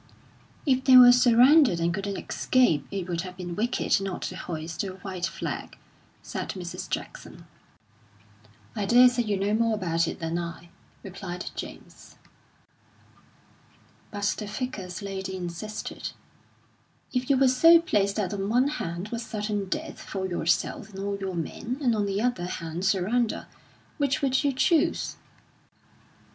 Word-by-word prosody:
"If 260 Hz, -2 st, +2 dB
they 260 Hz, -1 st, +8 dB
were 245 Hz, -1 st, +10 dB
surrounded 250 Hz, -, +6 dB
and 170 Hz, +1 st, +1 dB
couldn't 195 Hz, +1 st, -3 dB
escape, 245 Hz, -, +1 dB
it 195 Hz, -3 st, -4 dB
would 170 Hz, -2 st, -2 dB
have 180 Hz, 0 st, -8 dB
been 175 Hz, -2 st, -5 dB
wicked 225 Hz, -1 st, +1 dB
not 195 Hz, -2 st, -4 dB
to 185 Hz, -, -4 dB
hoist 165 Hz, -2 st, -5 dB
the 195 Hz, -2 st, -4 dB
white 185 Hz, -2 st, -3 dB
flag," 190 Hz, -, -5 dB, 0.5 s
said -, -, -5 dB
Mrs. 180 Hz, -3 st, -6 dB
Jackson. -, -, -6 dB, 1.3 s
"I 200 Hz, -, -2 dB
daresay 245 Hz, +1 st, +6 dB
you 210 Hz, -4 st, -1 dB
know 200 Hz, +2 st, 0 dB
more 225 Hz, 0 st, +2 dB
about 165 Hz, -4 st, 0 dB
it -, -, -4 dB
than 165 Hz, 0 st, -2 dB
I," 170 Hz, 0 st, -7 dB, 0.3 s
replied 185 Hz, -2 st, -6 dB
James. -, -, -10 dB, 1.9 s
But 205 Hz, -1 st, -6 dB, 0.2 s
the 210 Hz, -, -5 dB
Vicar's 210 Hz, -4 st, -5 dB
lady 190 Hz, -1 st, -4 dB
insisted: 185 Hz, +4 st, -6 dB, 1.0 s
"If 250 Hz, +1 st, -1 dB
you 275 Hz, -, +4 dB
were 270 Hz, 0 st, +5 dB
so 330 Hz, +7 st, +7 dB
placed 205 Hz, -, +1 dB
that 205 Hz, -3 st, -1 dB
on 200 Hz, 0 st, -2 dB
one 250 Hz, +5 st, +3 dB
hand 170 Hz, +4 st, -4 dB
was 235 Hz, +1 st, -4 dB
certain 210 Hz, -2 st, -3 dB
death -, -, -4 dB
for 190 Hz, -1 st, -4 dB
yourself 175 Hz, +3 st, -1 dB
and 195 Hz, -, -12 dB
all 200 Hz, +1 st, -3 dB
your 190 Hz, -2 st, -4 dB
men, 230 Hz, +9 st, -4 dB
and 245 Hz, -6 st, +2 dB
on 205 Hz, -1 st, 0 dB
the 200 Hz, +2 st, -1 dB
other 240 Hz, -8 st, 0 dB
hand 170 Hz, 0 st, -4 dB
surrender, 215 Hz, +4 st, +1 dB, 0.5 s
which 285 Hz, +1 st, 0 dB
would 265 Hz, 0 st, +2 dB
you 285 Hz, -, +2 dB
chose?" 310 Hz, +5 st, +1 dB
200 Hz, 150 wpm, -26 LUFS, 180-245 Hz, 1.9 s, were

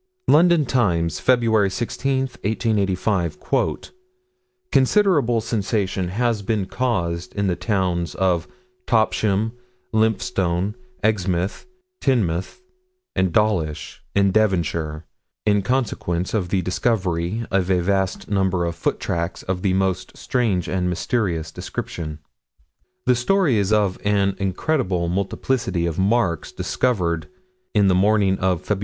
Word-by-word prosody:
London 170 Hz, 0 st, +5 dB
Times, 85 Hz, -, +1 dB
Feb 115 Hz, -5 st, +3 dB
16, 130 Hz, +4 st, -1 dB, 0.2 s
1855: 100 Hz, -6 st, 0 dB, 1.3 s
"Considerable 135 Hz, -, +3 dB
sensation 100 Hz, -4 st, -1 dB
has 115 Hz, +3 st, 0 dB
been 100 Hz, -1 st, -1 dB
caused 90 Hz, -9 st, -2 dB
in 100 Hz, -1 st, 0 dB
the 90 Hz, -2 st, +1 dB
towns 90 Hz, -4 st, -1 dB
of 90 Hz, -3 st, +1 dB, 0.4 s
Topsham, 110 Hz, -1 st, +2 dB, 0.4 s
Lymphstone, 105 Hz, -4 st, +1 dB, 0.3 s
Exmouth, 95 Hz, -, 0 dB, 0.4 s
Teignmouth, 95 Hz, -, 0 dB, 0.5 s
and 95 Hz, -2 st, +1 dB
Dawlish, 85 Hz, -7 st, 0 dB
in 100 Hz, -1 st, +4 dB
Devonshire, 85 Hz, -6 st, 0 dB, 0.4 s
in 105 Hz, -1 st, +3 dB
consequence 100 Hz, -7 st, -1 dB
of 95 Hz, -6 st, 0 dB
the 95 Hz, -1 st, 0 dB
discovery 90 Hz, +1 st, -1 dB
of 95 Hz, -1 st, +1 dB
a 90 Hz, -2 st, +3 dB
vast 95 Hz, 0 st, 0 dB
number 95 Hz, -3 st, +1 dB
of 85 Hz, -, -2 dB
foot -, -, -1 dB
tracks 85 Hz, +1 st, -3 dB
of 90 Hz, -1 st, -3 dB
a 95 Hz, -2 st, +2 dB
most 95 Hz, -1 st, -1 dB
strange 110 Hz, -9 st, 0 dB
and 90 Hz, -1 st, 0 dB
mysterious 90 Hz, -4 st, -1 dB
description." 80 Hz, -1 st, -5 dB, 0.9 s
The 125 Hz, -, +5 dB
story 140 Hz, -, +2 dB
is 100 Hz, 0 st, 0 dB
of 105 Hz, -3 st, +2 dB
an 100 Hz, -1 st, +2 dB
incredible 95 Hz, -, 0 dB
multiplicity 95 Hz, 0 st, -1 dB
of 85 Hz, +1 st, -2 dB
marks 95 Hz, -5 st, +1 dB
discovered 90 Hz, -10 st, -1 dB, 0.5 s
in 100 Hz, -2 st, +5 dB
the 95 Hz, -, +4 dB
morning 100 Hz, 0 st, +3 dB
of 90 Hz, -2 st, 0 dB
Feb. 105 Hz, -2 st, 0 dB
95 Hz, 115 wpm, -22 LUFS, 90-110 Hz, 1.3 s, London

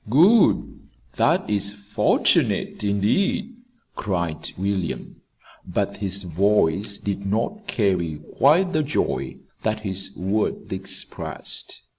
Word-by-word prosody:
"Good! 185 Hz, -, +4 dB, 0.4 s
That -, -, +3 dB
is 100 Hz, -1 st, -1 dB
fortunate, 105 Hz, +1 st, +1 dB
indeed," 105 Hz, -, +1 dB, 0.4 s
cried 85 Hz, -6 st, -2 dB
William; 95 Hz, -2 st, -3 dB, 0.4 s
but -, -, -2 dB
his 100 Hz, -1 st, -2 dB
voice 100 Hz, +2 st, +2 dB
did 100 Hz, -1 st, -3 dB
not 115 Hz, -, -2 dB
carry 90 Hz, -8 st, 0 dB, 0.2 s
quite 175 Hz, +7 st, +5 dB
the 155 Hz, -, +3 dB
joy 150 Hz, 0 st, -1 dB, 0.3 s
that 110 Hz, 0 st, -1 dB
his 95 Hz, -1 st, -3 dB
words 100 Hz, +4 st, -1 dB
expressed. -, -, -5 dB
100 Hz, 100 wpm, -23 LUFS, 95-115 Hz, 0.4 s, quite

